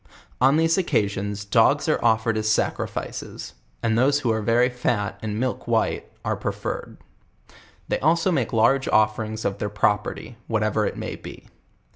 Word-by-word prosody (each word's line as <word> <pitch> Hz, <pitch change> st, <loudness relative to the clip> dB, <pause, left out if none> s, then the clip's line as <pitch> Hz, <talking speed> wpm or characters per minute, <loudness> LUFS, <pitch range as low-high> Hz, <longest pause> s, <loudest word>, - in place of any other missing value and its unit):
On 135 Hz, +4 st, +5 dB
these 165 Hz, +3 st, +3 dB
occasions 105 Hz, -, -1 dB
dogs 100 Hz, -, +3 dB
are -, -, +1 dB
offered 115 Hz, -1 st, +2 dB
as 110 Hz, 0 st, 0 dB
sacrifices; 110 Hz, -, -3 dB, 0.3 s
and 110 Hz, -1 st, +2 dB
those 140 Hz, +4 st, +3 dB
who 120 Hz, -, +1 dB
arc 110 Hz, -1 st, -1 dB
very 120 Hz, +2 st, +4 dB
fat, 120 Hz, -5 st, -2 dB
and 105 Hz, -1 st, -3 dB
milk 130 Hz, 0 st, -2 dB
white, -, -, 0 dB
are -, -, 0 dB
preferred. -, -, -5 dB, 0.9 s
They -, -, -1 dB
also 165 Hz, +5 st, +2 dB
make 130 Hz, -9 st, 0 dB
large 130 Hz, +4 st, +3 dB
offer 110 Hz, 0 st, +2 dB
ings 110 Hz, 0 st, -6 dB
of 100 Hz, 0 st, -1 dB
their 105 Hz, -, -2 dB
property, 105 Hz, +3 st, -1 dB
whatever 110 Hz, -1 st, +1 dB
it -, -, -5 dB
may -, -, -5 dB
be. -, -, -11 dB
110 Hz, 160 wpm, -24 LUFS, 105-125 Hz, 0.9 s, On